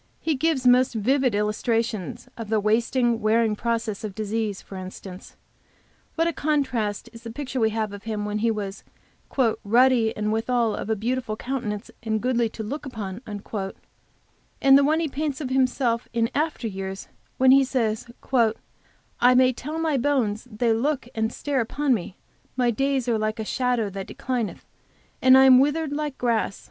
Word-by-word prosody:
He 320 - 0
gives 290 -2 0
most 250 0 +5
vivid 255 +2 +2
illustrations 225 +1 -1
of 225 -3 -7
the 220 -1 +2
wasting, 230 +2 +1
wearing 220 0 +2
process 225 -2 -2
of 205 -3 -5
disease 215 -1 -2
for 195 - -11
instance, 185 0 -9 0.8
what 330 - +2
a 335 - 0
contrast 255 -9 -1
is 230 - -11
the 230 - -8
picture 260 +2 -4
we 220 -1 +3
have 215 -2 -2
of 205 +1 -10
him 215 -2 -3
when 210 0 -2
he 230 +2 +2
was 205 -3 -4 0.8
"ruddy, 235 +1 +3
and 210 0 0
withal 230 0 +1
of - - -5
a 220 - +2
beautiful 235 +1 -2
countenance, 225 -4 -4
and 220 -2 -1
goodly 240 -1 +1
to 220 - -7
look 275 +5 -5
to," 205 -2 -6 1.4
and 270 0 +6
the 280 - +6
one 310 +3 +2
he 330 - 0
paints 290 0 -3
of 265 -4 -4
himself 255 -3 +1
in 230 -1 +1
after 295 -4 -1
years, 195 -1 -6 0.3
when 260 0 +6
he 275 +1 +7
says, 230 -4 -1 1.1
"I 250 +1 +6
may 255 0 +5
tell 285 +5 -7
all - - -2
my 315 -4 +1
bones 245 -5 0
they 230 +1 +1
look 260 +2 -1
and 220 0 -1
stare 280 0 -1
upon 275 +4 0
me; 190 -4 -4 0.4
my 245 -2 +3
days 270 +1 0
are 230 -2 +1
like 215 0 -1
a 220 - -4
shadow 250 -2 0
that 195 0 -6
declineth, 255 -4 -3 0.6
and 260 0 +7
I 265 - +7
am 260 -1 +8
withered 295 +2 +1
like 295 -2 -3
grass. 230 -5 0
235 Hz, 175 wpm, -24 LUFS, 215-265 Hz, 1.4 s, am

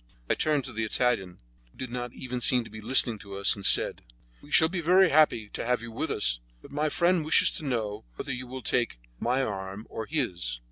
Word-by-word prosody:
I - - +6
turned 150 -3 0
to 130 - -7
the 110 +1 -2
Italian, 110 -5 0 0.3
who - - -27
did 130 -2 -6
not 120 -1 -4
even 125 0 -6
seem 125 -3 +4
to - - -13
be 110 - -9
listening 120 -1 +4
to 100 -1 -10
us, 100 0 +3
and 100 - -10
said: - - +4 0.4
"We 145 - -16
shall 160 - +5
be 175 +1 -4
very 180 +3 +5
happy 145 -7 +3
to - - -5
have 125 0 -1
you 115 - -8
with 110 - -3
us, - - +1 0.2
but - - -15
my 150 +2 -1
friend 170 +2 +2
wishes 155 - +4
to - - -8
know 110 -5 -3
whether 135 - -5
you 125 0 -6
will 130 0 -8
take 120 - 0 0.2
my 125 +3 0
arm 100 -1 -5
or 110 -1 -5
his?" 90 - -2
125 Hz, 230 wpm, -27 LUFS, 105-140 Hz, 0.4 s, I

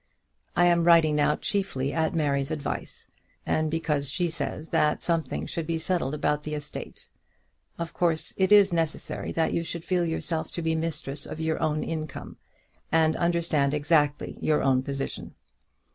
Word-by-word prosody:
I 175 - +5
am 170 -1 +4
writing 165 -3 +6
now 150 0 +3
chiefly 145 -10 -1
at 160 0 0
Mary's 140 -3 +1
advice, 150 -3 -4 0.4
and 155 0 +1
because 150 -3 -1
she 175 +3 0
says 160 -1 -4
that 150 -2 +2
something 165 -2 -1
should 165 -2 -3
be 165 -1 0
settled 160 -4 0
about 150 0 0
the 150 0 -4
estate. 150 0 -7 0.7
Of 170 -1 -5
course 165 -3 0
it 190 0 +1
is 205 -3 +7
necessary 165 -2 -2
that 165 - +1
you 165 - 0
should 170 0 -5
feel 180 -2 +1
yourself 160 0 -2
to 170 - -3
be 160 0 +1
the 160 - 0
mistress 150 -3 -2
of 160 - -7
your 160 0 -1
own 155 -1 0
income, 155 -1 -5 0.5
and 160 -1 +3
understand 165 -5 +1
exactly 150 -1 +1
your 155 - +2
own 130 -2 +3
position. 135 +1 -4
160 Hz, 165 wpm, -27 LUFS, 150-170 Hz, 0.7 s, is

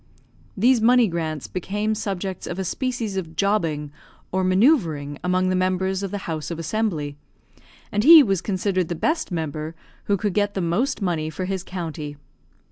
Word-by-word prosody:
These 240 +3 +4
money 245 0 +5
grants 160 - -3
became 205 - -2
subjects 195 -3 -4
of 175 - -4
a 190 - -1
species 230 0 -2
of 165 -4 -5
jobbing, 165 -7 0 0.4
or 190 0 0
manoeuvering, 185 - +2
among 185 +1 +1
the 185 - +1
members 185 +1 0
of 195 - -3
the 205 - -3
House 155 -3 -4
of 170 - -4
Assembly; 165 -5 -2 0.7
and 210 +1 +1
he 320 +1 +10
was 195 -6 0
considered 185 -2 0
the 175 - -3
best 315 - -1
member 160 -1 -3 0.3
who 200 - +2
could 205 0 -1
get 205 0 0
the - - -1
most 195 +7 0
money 160 -4 -1
for 170 +4 -4
his 190 -1 -3
county. 155 -6 -6
185 Hz, 170 wpm, -23 LUFS, 165-205 Hz, 0.7 s, he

